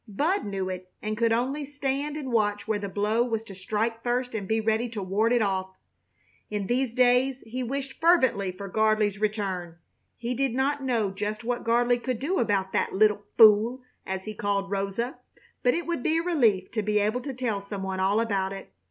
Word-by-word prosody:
Bud 300 - 0
knew 195 -2 -3
it 185 0 -6
and 215 0 -3
could 230 +1 +2
only 260 +6 0
stand 285 +1 -2
and 270 -4 -5
watch 205 -2 +1
where 215 -1 0
the 200 -1 -4
blow 210 +4 +1
was 225 -2 -1
to 205 - -10
strike 220 +4 -2
first 245 +1 -1
and 205 -4 -3
be 220 +2 +1
ready 220 +2 0
to 215 -3 -5
ward 205 +5 +1
it 240 -2 +3
off. 190 -1 -2 0.7
In 210 -2 -2
these 250 +3 0
days 255 +1 +3
he 245 +3 -4
wished 270 +3 -4
fervently 260 - +3
for 195 +2 -8
Gardley's 215 0 +1
return. 190 -5 -2 0.4
He 240 +1 -3
did 260 -1 0
not 275 +2 +1
know 230 -6 0
just 210 +3 -4
what 245 +1 -2
Gardley 240 +1 +2
could 255 -1 -2
do 310 +11 -1
about 195 -4 0
"that - - 0
little 210 0 +3
fool," 225 +3 +6 0.2
as 190 0 -4
he 215 - -6
called 200 -2 -1
Rosa, 200 +6 -2 0.4
but 245 - +3
it 340 - -2
would 340 -6 -2
be 320 +5 +1
a 330 - 0
relief 230 - +2
to 220 - -1
be 210 0 0
able 215 +4 +1
to 275 - -5
tell 230 -5 -1
some 200 -1 -6
one 190 0 -3
all 195 +3 +2
about 195 -4 0
it. 195 - -9
220 Hz, 205 wpm, -27 LUFS, 200-250 Hz, 0.7 s, fool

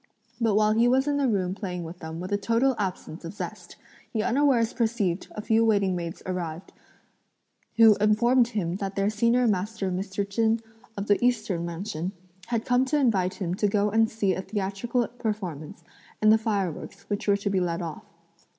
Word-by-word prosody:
But 225 -4 +2
while 215 0 +4
he 230 +2 +4
was 265 +3 +3
in 290 -1 +1
the 280 -2 +2
room 190 -5 0
playing 180 -4 -5
with 170 +2 -9
them 160 0 -7
with 185 +3 -6
a - - +3
total 230 +6 +2
absence 180 -4 -4
of 165 - -6
zest, - - -7 0.4
he 220 -2 -1
unawares 250 -3 +2
perceived 220 -7 0
a 210 - -5
few 225 +1 +3
waiting 200 -4 +2
maids 170 -1 -5
arrive, 175 -2 -4 1.1
who 225 -1 +8
informed 235 +4 +4
him 190 -7 -2
that 195 -1 -4
their 200 +1 +1
senior 235 +3 +2
master 205 -1 -1
Mr. 195 +2 -3
Chen, 225 +2 +1 0.4
of 200 - -3
the 205 +2 +2
Eastern 215 -8 0
Mansion, 180 +1 -4 0.3
had 230 -1 -1
come 245 0 +3
to 295 +3 +1
invite 200 -10 +2
him 175 -3 -3
to 205 +3 +1
go 205 0 +1
and 225 +1 +3
see 205 -4 0
a - - -3
theatrical 205 +5 -2
performance, 190 - -5 0.4
and 215 0 +5
the 220 - +4
fireworks, 200 -7 -3
which 205 +2 -3
were 200 0 +4
to 200 0 -2
be 190 - +2
let 175 -1 -1
off. 160 -2 -6
205 Hz, 185 wpm, -26 LUFS, 185-230 Hz, 1.1 s, who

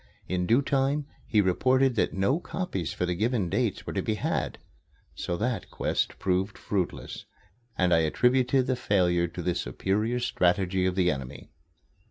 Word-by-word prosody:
In 90 -1 -1
due 120 +5 +4
time 140 +1 +1 0.2
he 105 -3 +3
reported 130 +8 +3
that 115 - +1
no 100 - +1
copies 135 - -3
for 90 - -2
the 90 - -1
given 110 0 0
dates - - -1
were - - -5
to - - 0
be 110 - -1
had. 105 - -2 0.6
So 85 - -3
that 115 +3 -2
quest - - -1
proved 95 +2 -1
fruitless, 95 -4 -3 0.5
and 90 -1 +3
I 80 - +5
attributed 125 - +2
the 130 - 0
failure 90 -6 +2
to 85 +1 -7
the 90 - +1
superior 105 - -1
strategy 95 -5 +1
of 90 - -1
the 90 -2 +3
enemy. 65 -2 -7
95 Hz, 165 wpm, -27 LUFS, 90-125 Hz, 0.6 s, I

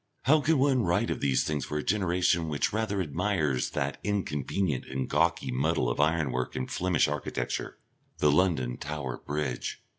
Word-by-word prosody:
How 150 +4 +5
can 160 +1 +3
one 135 -1 +3
write 85 -5 +1
of - - -2
these 65 -2 +2
things 75 -3 -2
for 75 - -3
a 75 - -2
generation 90 -4 +1
which 75 +4 0
rather 110 -3 0
admires 75 -4 0
that - - -2
inconvenient 95 -5 -1
and 65 -1 -3
gawky 85 -2 +1
muddle 65 -1 +1
of - - -4
ironwork 75 -5 +1
and 65 - -2
Flemish 90 -2 +2
architecture, 75 -1 -3 0.4
the 75 - +4
London 70 -8 +1
Tower 70 -4 -5
Bridge. 70 -4 -3
75 Hz, 160 wpm, -28 LUFS, 70-95 Hz, 0.4 s, How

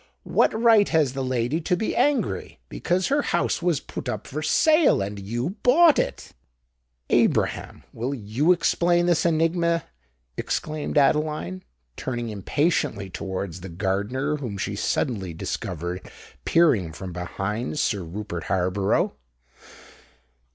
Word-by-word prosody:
"What 220 - +2
right 225 -3 +5
has 150 -6 +2
the 135 -1 -3
lady 130 +4 -1
to 180 +2 0
be 220 - -2
angry? 280 +2 0
Because 180 +1 -1
her 285 +2 +2
house 175 -7 0
was 170 -4 +1
put 130 - -7
up 110 -3 -4
for 150 +3 -5
sale, 310 - +4
and 100 +1 -4
you 120 - -3
bought 310 +4 +6
it——" - - -3 0.8
"Abraham, - - +1
will 120 +4 -3
you 120 - +1
explain 175 0 +2
this 175 -1 +2
enigma?" 170 0 +1 0.5
exclaimed 155 -1 -3
Adeline, 145 - +1 0.4
turning 120 -2 -3
impatiently 110 - -1
towards 95 -3 -5
the 95 - -7
gardener, 105 - -1
whom 120 -8 -5
she - - -3
suddenly 95 -9 -1
discovered 90 +2 -4 0.4
peering 125 - +3
from 90 +1 -7
behind 95 - -3
Sir 105 -8 0
Rupert 90 0 -6
Harborough. 95 +1 +1
130 Hz, 125 wpm, -24 LUFS, -, 0.8 s, bought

